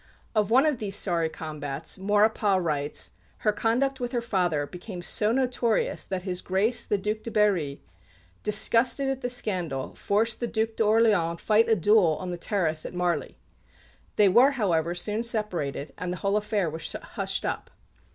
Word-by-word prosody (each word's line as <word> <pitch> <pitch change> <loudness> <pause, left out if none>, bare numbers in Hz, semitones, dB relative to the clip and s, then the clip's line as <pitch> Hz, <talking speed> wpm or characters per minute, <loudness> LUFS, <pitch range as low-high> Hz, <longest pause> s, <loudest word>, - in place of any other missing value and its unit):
Of 215 -2 +1
one 260 +6 +5
of 295 -6 +1
these 200 -2 -2
sorry 170 -5 0
combats, 150 +1 -5
Maurepas 205 0 +2
writes, 150 -4 -2 0.3
"Her 210 - +5
conduct 250 +6 0
with 245 0 -4
her 240 - +1
father 180 -10 0
became 180 +3 -8
so 210 +4 +1
notorious 245 -3 0
that 185 -1 -4
His 185 -2 -3
Grace 200 +6 0
the 205 - 0
Duc 210 +2 -2
de 230 - -5
Berry, 190 -10 +1 0.6
disgusted 230 +6 +2
at 265 -1 -2
the 245 - -2
scandal, 180 - -2
forced 215 +2 0
the 240 - -1
Duc 220 -1 0
d'Orléans 215 -6 +2
to - - -19
fight 220 +1 +3
a 225 - +5
duel 190 -4 +4
on 180 -1 -4
the 175 - -4
terrace 165 -6 -1
at - - -7
Marly. 175 -5 -1 0.8
They 210 - +5
were, 240 +8 +6
however, 175 - 0
soon 210 +5 -1
separated, 185 - -3
and 180 -1 -3
the 180 - -4
whole 200 +3 0
affair 210 -3 0
was 160 +1 -4
hushed - - -3
up." - - -3
205 Hz, 170 wpm, -26 LUFS, 175-225 Hz, 0.8 s, were